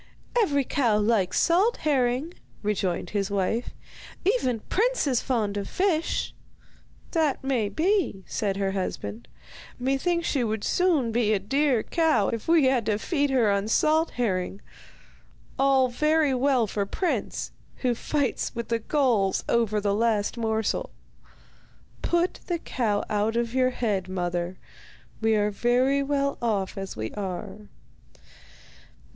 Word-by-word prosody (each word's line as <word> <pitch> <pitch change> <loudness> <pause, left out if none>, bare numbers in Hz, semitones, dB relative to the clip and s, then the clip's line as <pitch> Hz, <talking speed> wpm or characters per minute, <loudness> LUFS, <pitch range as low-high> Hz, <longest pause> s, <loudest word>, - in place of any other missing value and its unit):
'Every 295 - +3
cow 240 -5 +1
likes 210 -3 +2
salt 380 +8 +3
herring,' 270 +2 +1 0.3
rejoined 185 -4 -1
his 200 -1 -1
wife. 200 +4 -1 0.6
'Even 260 - +1
Prince - - +1
is 260 -4 +1
fond 215 -6 -1
of 200 - -4
fish.' 350 -4 0 0.8
'That 310 -6 +1
may 250 -6 0
be,' 345 - 0
said 200 -2 -2
her 195 -1 0
husband. 120 - -4 0.5
'Methinks 275 +7 0
she 270 -4 +1
would 220 -2 -2
soon 330 -10 +2
be 220 -2 +2
a - - +2
dear 265 +4 +1
cow 320 - +2
if 230 -2 -4
we 325 -4 +5
had 260 -4 +2
to 210 -2 +2
feed 285 - 0
her 245 -6 +3
on 200 +1 0
salt 310 +8 +3
herring. 195 -5 -1 1.0
All 270 -1 +4
very 305 +3 +2
well 255 -2 +2
for 200 -1 -2
Prince, 360 - -2 0.3
who 250 -1 +3
fights 280 +3 -2
with 235 0 -4
the 230 -1 +1
gulls 230 -7 +1
over 225 -3 +2
the 200 -1 0
last 215 0 +1
morsel. 220 -2 -1 1.1
Put 345 +1 0
the 345 - 0
cow 225 -10 -1
out 215 +1 0
of 235 0 -1
your 255 -1 +3
head, 210 -7 -2
mother, 175 -1 -2 0.6
we 220 0 +3
are 210 0 +1
very 250 +6 +2
well 280 0 -1
off 205 -5 -1
as 195 -1 -6
we 110 0 -4
are. 195 +1 -6
235 Hz, 140 wpm, -26 LUFS, 205-280 Hz, 1.1 s, we